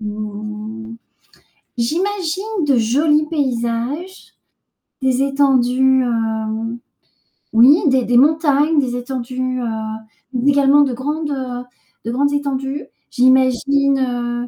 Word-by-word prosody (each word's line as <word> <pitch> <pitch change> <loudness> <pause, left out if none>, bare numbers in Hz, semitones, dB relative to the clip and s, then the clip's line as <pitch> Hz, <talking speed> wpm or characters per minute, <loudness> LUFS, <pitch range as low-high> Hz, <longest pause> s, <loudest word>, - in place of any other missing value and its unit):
hem, 215 +1 -7 0.8
j'imagine 375 - -2
de 275 -3 +3
jolis 295 +7 +2
paysages, 265 +4 -3 0.7
des 260 0 +1
étendues, 265 -2 +2
hem 225 -1 -2 0.8
oui, 255 +8 +6
des 260 -3 +2
des 240 0 +2
montagnes, 300 +1 +3
des 250 -3 -1
étendues, 255 0 -4
heu, - - -3 0.7
mais 255 +3 +1
également 280 +1 +4
de 275 -3 +1
grandes, 295 +5 -3
heu, 255 -3 -4 0.4
de 230 - -2
grandes 285 +4 +1
étendues. 280 0 -3 0.3
J'imagine, 265 +2 +2
heu, 245 -1 -2
260 Hz, 105 wpm, -18 LUFS, 240-285 Hz, 0.8 s, oui